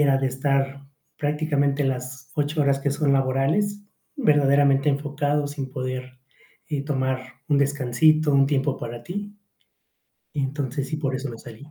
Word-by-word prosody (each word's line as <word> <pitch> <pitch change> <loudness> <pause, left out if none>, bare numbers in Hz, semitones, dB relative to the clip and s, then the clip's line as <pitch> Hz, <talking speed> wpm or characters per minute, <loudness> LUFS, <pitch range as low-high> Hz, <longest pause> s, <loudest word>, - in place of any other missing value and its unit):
era 140 -2 +4
de 135 -1 +1
estar 135 +1 -1 0.3
prácticamente 145 -1 +1
las 130 -1 -4
8 150 0 0
horas 140 -1 +2
que 140 - 0
son 140 0 +1
laborales, 135 +11 +1 0.3
verdaderamente 140 - +4
enfocados, 145 0 0
sin 135 -3 -5
poder, 130 -1 -5 0.5
eh, 145 -3 -1
tomar 130 -2 -1 0.3
un 145 -2 +3
descansito, 145 +2 +3
un 135 0 +5
tiempo 140 0 +1
para 120 0 -6
ti. 205 +3 -6 1.0
Y 150 - -2
entonces, 135 0 -2
sí, 155 - -2
por 140 -3 -2
eso 135 0 -3
me 115 - -8
salí. 120 +7 -12
140 Hz, 150 wpm, -24 LUFS, 135-150 Hz, 1.0 s, un